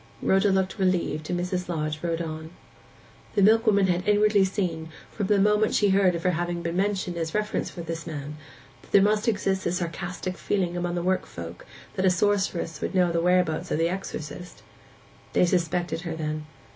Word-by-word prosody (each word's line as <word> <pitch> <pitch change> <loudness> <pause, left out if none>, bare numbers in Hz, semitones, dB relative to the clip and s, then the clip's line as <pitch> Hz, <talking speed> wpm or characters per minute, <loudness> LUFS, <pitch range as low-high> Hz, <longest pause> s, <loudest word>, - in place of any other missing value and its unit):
Rhoda 195 +2 +3
looked 190 +1 0
relieved, 175 -5 0
and 175 - 0
Mrs. 180 0 -2
Lodge 155 -2 -2
rode 170 -1 -1
on. 160 0 -6 0.9
The 200 - +4
milkwoman 215 -1 +5
had 180 0 0
inwardly 210 -1 +4
seen, 175 -5 -2 0.2
from 205 -3 -3
the 205 - +3
moment 210 +2 +3
she 205 - +3
heard 190 -2 +4
of 170 - -4
her 180 - +3
having 175 0 -2
been 170 0 -2
mentioned 190 -2 -1
as 165 +1 -3
a - - +4
reference 210 0 -1
for 175 - -8
this 165 0 -5
man, 150 -2 -5 0.5
that - - -20
there 200 - +6
must 210 +2 +2
exist 195 -4 0
a - - +1
sarcastic 180 +1 -4
feeling 180 -4 -1
among 175 0 -2
the 175 - -2
work 185 +1 0
folk 85 +1 -9 0.3
that 190 - -2
a - - +7
sorceress 180 -4 0
would - - -3
know 180 -2 +3
the 170 0 +1
whereabouts 180 -2 +2
of - - 0
the 165 +1 +2
exorcist. 180 -2 -6 0.7
They - - +4
suspected 175 -1 0
her, 170 -3 -4
then. 155 -1 -4
180 Hz, 195 wpm, -26 LUFS, 165-195 Hz, 0.9 s, a